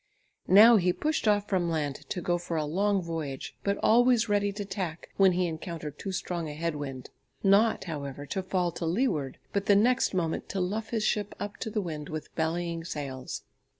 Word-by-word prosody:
Now 220 Hz, +5 st, +8 dB
he 180 Hz, -2 st, +2 dB
pushed 305 Hz, -, -1 dB
off 205 Hz, -1 st, +3 dB
from 180 Hz, -4 st, +1 dB
land 150 Hz, -4 st, -3 dB
to 180 Hz, -, -2 dB
go 175 Hz, 0 st, +1 dB
for 170 Hz, -1 st, -3 dB
a 155 Hz, -, 0 dB
long 195 Hz, +5 st, +1 dB
voyage, 160 Hz, -5 st, -5 dB
but 200 Hz, 0 st, 0 dB
always 240 Hz, 0 st, +5 dB
ready 205 Hz, -1 st, +2 dB
to 205 Hz, 0 st, -5 dB
tack 185 Hz, -4 st, -5 dB
when 190 Hz, -2 st, +6 dB
he 180 Hz, +1 st, +1 dB
encountered 160 Hz, -3 st, -5 dB
too 195 Hz, -, -4 dB
strong 175 Hz, -3 st, -3 dB
a 150 Hz, -, -6 dB
head 165 Hz, 0 st, -2 dB
wind, 135 Hz, -3 st, -6 dB, 0.3 s
not, 205 Hz, +3 st, +4 dB
however, 145 Hz, -4 st, -5 dB
to 190 Hz, +7 st, -2 dB
fall 185 Hz, -2 st, 0 dB
to 170 Hz, -, -5 dB
leeward, 165 Hz, -, 0 dB, 0.2 s
but 200 Hz, 0 st, -1 dB
the 205 Hz, -, +6 dB
next 240 Hz, +1 st, +3 dB
moment 165 Hz, -3 st, -1 dB
to 195 Hz, -, -2 dB
luff 210 Hz, +5 st, -2 dB
his 225 Hz, -2 st, -1 dB
ship 210 Hz, -1 st, 0 dB
up 205 Hz, 0 st, -5 dB
to -, -, -4 dB
the 215 Hz, 0 st, -1 dB
wind 155 Hz, -5 st, -5 dB
with 155 Hz, -1 st, -6 dB
bellying 165 Hz, +1 st, -1 dB
sails. 140 Hz, -5 st, -5 dB
180 Hz, 200 wpm, -28 LUFS, 160-205 Hz, 0.3 s, Now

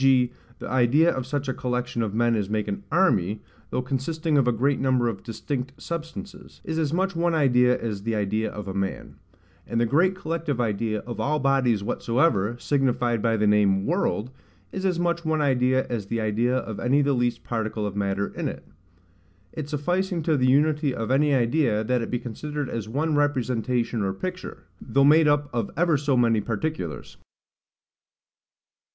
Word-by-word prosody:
g. 130 Hz, -2 st, +4 dB, 0.3 s
the -, -, -7 dB
idea 130 Hz, +7 st, +3 dB
of 130 Hz, -1 st, -4 dB
such 145 Hz, 0 st, -2 dB
a 130 Hz, -, 0 dB
collection 125 Hz, -1 st, -2 dB
of 110 Hz, -3 st, -1 dB
men 120 Hz, +2 st, +2 dB
as 105 Hz, -3 st, -2 dB
make 105 Hz, 0 st, -1 dB
an 200 Hz, 0 st, -3 dB
ARMY, 110 Hz, -, +2 dB, 0.3 s
though 130 Hz, -, -2 dB
consisting 150 Hz, +5 st, -1 dB
of 135 Hz, -3 st, +3 dB
a -, -, +4 dB
great 135 Hz, +5 st, +1 dB
number 130 Hz, -2 st, +2 dB
of 110 Hz, -4 st, -3 dB
distinct 130 Hz, +3 st, -5 dB
substances, 170 Hz, +4 st, -7 dB
is 160 Hz, 0 st, -3 dB
as 150 Hz, -3 st, 0 dB
much 190 Hz, +2 st, 0 dB
one 170 Hz, 0 st, +1 dB
idea 125 Hz, -4 st, +3 dB
as 105 Hz, -4 st, -4 dB
the 115 Hz, +2 st, -2 dB
idea 105 Hz, +1 st, 0 dB
of 105 Hz, -2 st, -7 dB
a 95 Hz, -, -4 dB
man: 100 Hz, 0 st, -4 dB, 0.5 s
and 115 Hz, -, -1 dB
the 120 Hz, -, +3 dB
great 175 Hz, +10 st, +3 dB
collective 165 Hz, -6 st, -3 dB
idea 110 Hz, -2 st, -1 dB
of 120 Hz, 0 st, -7 dB
all 150 Hz, +2 st, +1 dB
bodies 130 Hz, -7 st, +2 dB
whatsoever, 115 Hz, -2 st, +1 dB
signified 125 Hz, -4 st, 0 dB
by 115 Hz, 0 st, +1 dB
the 105 Hz, -, +1 dB
name 100 Hz, -2 st, +3 dB
WORLD, 150 Hz, -, 0 dB, 0.4 s
is 190 Hz, 0 st, -2 dB
as 180 Hz, -2 st, 0 dB
much 170 Hz, -1 st, 0 dB
one 160 Hz, -1 st, 0 dB
idea 130 Hz, -2 st, +2 dB
as 110 Hz, -5 st, -4 dB
the 115 Hz, +2 st, -2 dB
idea 115 Hz, +4 st, +1 dB
of 110 Hz, -5 st, -4 dB
any 135 Hz, +4 st, +2 dB
the 140 Hz, 0 st, +2 dB
least 120 Hz, -1 st, 0 dB
particle 110 Hz, -2 st, -3 dB
of 100 Hz, -1 st, -4 dB
matter 100 Hz, 0 st, -1 dB
in -, -, -3 dB
it; -, -, -7 dB, 0.9 s
it 150 Hz, -2 st, -5 dB
sufficing 175 Hz, +4 st, -1 dB
to 160 Hz, 0 st, +2 dB
the 130 Hz, -2 st, +2 dB
unity 145 Hz, 0 st, +2 dB
of 115 Hz, +2 st, -3 dB
any 145 Hz, +2 st, +3 dB
idea, 120 Hz, -3 st, +2 dB
that 125 Hz, +2 st, 0 dB
it 115 Hz, -, -4 dB
be 125 Hz, -, 0 dB
considered 145 Hz, +4 st, -5 dB
as 110 Hz, -2 st, -4 dB
one 155 Hz, +6 st, 0 dB
representation 125 Hz, -5 st, 0 dB
or 95 Hz, -1 st, -1 dB
picture, 185 Hz, -, -6 dB, 0.2 s
though 140 Hz, -, +2 dB
made 155 Hz, +2 st, +6 dB
up 145 Hz, 0 st, +2 dB
of 115 Hz, -4 st, -1 dB
ever 170 Hz, -1 st, +3 dB
so 140 Hz, -2 st, +1 dB
many 115 Hz, -3 st, +3 dB
particulars. 110 Hz, -, -4 dB
125 Hz, 185 wpm, -25 LUFS, 115-150 Hz, 0.9 s, made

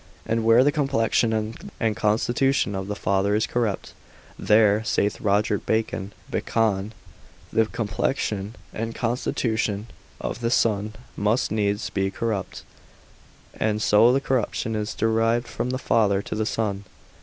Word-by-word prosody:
And 115 Hz, 0 st, 0 dB
where 115 Hz, +2 st, +6 dB
the 145 Hz, -, +3 dB
complexion 115 Hz, -6 st, +1 dB, 0.3 s
and 110 Hz, -2 st, +1 dB
constitution 120 Hz, +3 st, +1 dB
of 95 Hz, 0 st, -4 dB
the 105 Hz, -, -3 dB
father 100 Hz, +1 st, +1 dB
is 110 Hz, +1 st, +2 dB
corrupt, 115 Hz, -5 st, -2 dB, 0.4 s
there 105 Hz, 0 st, +4 dB
(saith 105 Hz, -1 st, 0 dB
Roger 105 Hz, 0 st, +2 dB
Bacon) 110 Hz, -3 st, -2 dB, 0.2 s
the -, -, 0 dB, 1.3 s
complexion 105 Hz, -1 st, -2 dB, 0.2 s
and 115 Hz, +1 st, -4 dB
constitution 110 Hz, -3 st, -1 dB, 0.3 s
of 115 Hz, -, -4 dB
the 115 Hz, -, +1 dB
son 105 Hz, -3 st, +1 dB, 0.2 s
must 105 Hz, +4 st, +1 dB
needs 105 Hz, 0 st, 0 dB
be 95 Hz, 0 st, 0 dB
corrupt, 105 Hz, -1 st, -3 dB, 0.9 s
and 105 Hz, -1 st, 0 dB
so 110 Hz, +2 st, +5 dB
the 135 Hz, -, +3 dB
corruption 120 Hz, -4 st, -1 dB
is 105 Hz, +1 st, -3 dB
derived 115 Hz, +2 st, +1 dB
from 125 Hz, -, -3 dB
the 130 Hz, -, -1 dB
father 100 Hz, -6 st, +2 dB
to -, -, -5 dB
the 110 Hz, 0 st, -1 dB
son. 105 Hz, -4 st, -2 dB
110 Hz, 130 wpm, -24 LUFS, 105-115 Hz, 1.3 s, where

